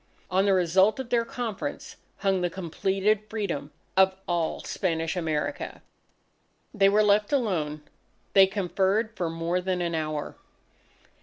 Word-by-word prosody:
On 190 +2 +3
the 195 - +4
result 190 +5 +3
of 260 -3 -6
their 235 -1 +3
conference, 230 -3 -5 0.2
hung 195 -2 +1
the 175 - +1
completed 195 +4 0
Freedom 190 -10 -3 0.2
of 190 0 +5
all 170 -2 0
Spanish 165 -3 -1
America. 160 - -3 0.9
They 195 -3 +5
were 210 +2 +4
left 210 0 +3
alone. 165 - 0 0.5
They 195 -1 +7
conferred 200 +3 0
for 175 -2 -2
more 165 +2 -1
than 185 0 -1
an 170 -1 -1
hour. 155 -2 -3
190 Hz, 135 wpm, -27 LUFS, 170-210 Hz, 0.9 s, They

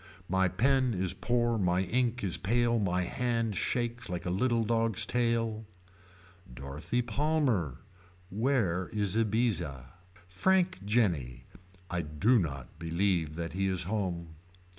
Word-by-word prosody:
My 95 +1 +2
pen 130 +5 +2
is 90 -1 0
poor 120 -1 0
my 90 -1 +2
ink 120 +4 0
is 95 -4 0
pale 120 +3 +1
my 90 -3 +1
hand 115 +1 -1
shakes 120 +3 -2
like 90 -1 -4
a 90 - -1
little 115 +4 +1
dog's 115 -2 +2
tail. 115 -2 0 0.9
Dorothy 70 - -3
Palmer. 120 - 0 0.5
Where 100 -6 +1
is 105 -2 -1
Ibizza. 100 - 0 0.4
Frank 185 - +1
Jenny. 85 - 0 0.5
I 90 -1 0
do 95 +11 +2
not 70 -5 -5
believe 85 -2 0
that 85 0 -4
he 95 +1 0
is 95 -1 0
home. 90 -4 -2
100 Hz, 125 wpm, -30 LUFS, 85-120 Hz, 0.9 s, My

